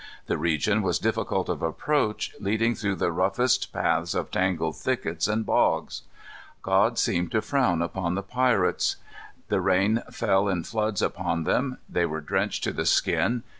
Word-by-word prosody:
The - - -2
region 85 +7 +1
was 90 -4 +1
difficult - - -1
of - - -3
approach, 105 - -1
leading 110 +4 +1
through 100 -3 -2
the 85 - 0
roughest 100 +9 +1
paths 80 +1 0
of - - -2
tangled 80 -4 0
thickets 85 -7 -1
and 110 +1 0
bogs. - - +1 0.6
God - - +2
seemed 85 0 +1
to 110 - +2
frown 125 - +1
upon 85 0 -2
the 100 - -3
pirates. 125 -3 +1 0.5
The - - +1
rain 100 +5 +2
fell 100 -3 +1
in 90 -3 -1
floods 110 -1 -1
upon 85 -1 -1
them. 130 - 0
They 85 -1 0
were 80 0 -4
drenched 75 - -1
to - - 0
the - - -2
skin. 105 +9 +2
95 Hz, 160 wpm, -26 LUFS, 85-110 Hz, 0.6 s, God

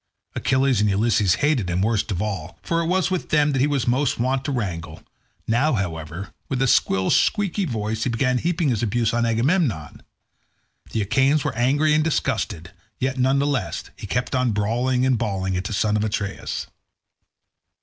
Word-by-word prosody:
Achilles 130 -4 +1
and 105 - +2
Ulysses 100 -2 +2
hated 130 -12 +1
him 90 +2 0
worst 110 -1 0
of 95 -1 -1
all, 95 -6 -5
for 165 0 0
it 165 - -2
was 185 +1 +1
with 185 - -2
them 150 -1 +3
that 135 -2 0
he 140 - +3
was 140 -4 0
most 130 +3 +1
wont 130 +2 0
to 145 - -1
wrangle; 90 - -4 0.4
now, 125 +7 +2
however, 85 -3 -4 0.2
with 135 - -1
a - - +2
shrill 95 -5 +2
squeaky 200 -2 +2
voice 110 -5 -2
he - - 0
began 125 +2 +1
heaping 170 -1 0
his 115 -5 0
abuse 115 +1 0
on 120 0 +1
Agamemnon. 115 - 0 0.9
The 110 - -1
Achaeans 135 +7 +2
were - - -1
angry 145 +6 +2
and 155 0 +3
disgusted, 85 - -2 0.3
yet 130 0 -2
none 130 +2 +3
the 140 - +2
less 135 -9 -2
he - - -8
kept 125 +5 -2
on 125 -3 +1
brawling 120 +5 +1
and 130 -3 +2
bawling 95 -4 -1
at 90 +1 -3
the 110 - -4
son 105 +1 +1
of 105 - +1
Atreus. 100 -2 -3
120 Hz, 185 wpm, -23 LUFS, 100-135 Hz, 0.9 s, them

